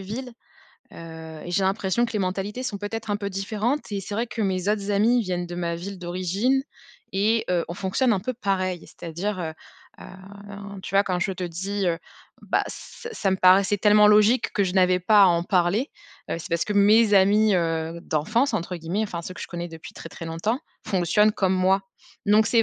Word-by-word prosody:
ville, 235 +6 -6 0.6
heu, 160 -1 -9
et 175 - -6
j'ai 195 +2 +1
l'impression 195 +4 +1
que - - -8
les 215 - -1
mentalités 195 +5 -3
sont 210 -6 -4
peut-être 215 +1 -5
un 205 - +1
peu 200 -1 -4
différentes. 215 +8 -2
Et 200 - -1
c'est 200 +2 -6
vrai 230 +3 -1
que 230 -1 -6
mes 190 0 -1
autres 205 -1 0
amis 225 +5 +3
viennent 180 -3 -3
de 175 - -7
ma 170 -1 -2
ville 190 +3 -7
d'origine 185 +9 0 0.5
et 215 +4 +2
heu, 175 -2 +1
on 170 - -5
fonctionne 200 +6 +1
un 195 - 0
peu 255 +6 -3
pareil. 185 -6 -1
C'est-à-dire, 185 +5 -5
heu 160 -2 -3 0.5
heu, 200 +1 -10
tu 195 - -7
vois 200 - +6
quand 180 -2 -1
je 185 +2 -1
te 185 0 -5
dis, 190 +3 -3
heu: 170 -1 0 0.4
«Bah, - - +1
ç 470 - -9
ça 200 - -1
me 190 - +1
paraissait 190 +2 +5
tellement 210 0 +6
logique 215 +4 +4
que 200 - +1
je 180 - -2
n'avais 185 -1 +3
pas 205 +3 +5
à - - +8
en 170 -1 +2
parler», 185 - +1 0.4
heu, - - -1
c'est 165 - -8
parce 170 0 +1
que 210 - -1
mes 210 +2 +5
amis, 205 +2 +5
heu, 165 -1 -1
«d'enfance» 220 - 0
entre 180 -1 -3
guillemets, 170 +6 -2
enfin 175 -5 -4
ceux 185 - -7
que - - -10
je - - -5
connais 175 0 -5
depuis 165 -1 -11
très, - - -9
très 165 - -8
longtemps, 190 - -2 0.3
fonctionnent 205 +3 +3
comme 190 -2 +1
moi. 190 +1 +3 0.5
Donc, 210 +1 +5
c'est 230 +1 +4
195 Hz, 210 wpm, -24 LUFS, 180-210 Hz, 0.6 s, à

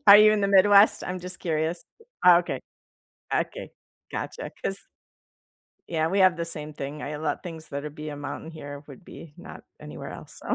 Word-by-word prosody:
Are 200 0 +11
you 215 0 +7
in 210 - +1
the 200 - +1
Midwest? 200 +1 +6
I'm 180 0 -4
just 180 0 -4
curious. 160 +1 -2 0.4
Oh, 180 -1 +9
okay. 175 - -3 0.8
Okay. - - -2 0.4
Gotcha, - - -5
'cause 195 - -1 1.1
yeah, 160 -2 0
we 195 +4 0
have 185 -2 +5
the 170 - -2
same 155 -2 -5
thing. 145 +1 -6
I 150 +1 -4
let 155 0 -3
things 165 -3 -7
that 140 0 -4
would 150 0 -7
be 155 0 -6
a 145 - -6
mountain 145 +3 -6
here 145 -2 -9
would 140 +4 -13
be 155 -3 -12
not - - -11 0.2
anywhere - - -8
else. - - -11
165 Hz, 190 wpm, -26 LUFS, 150-185 Hz, 1.1 s, Are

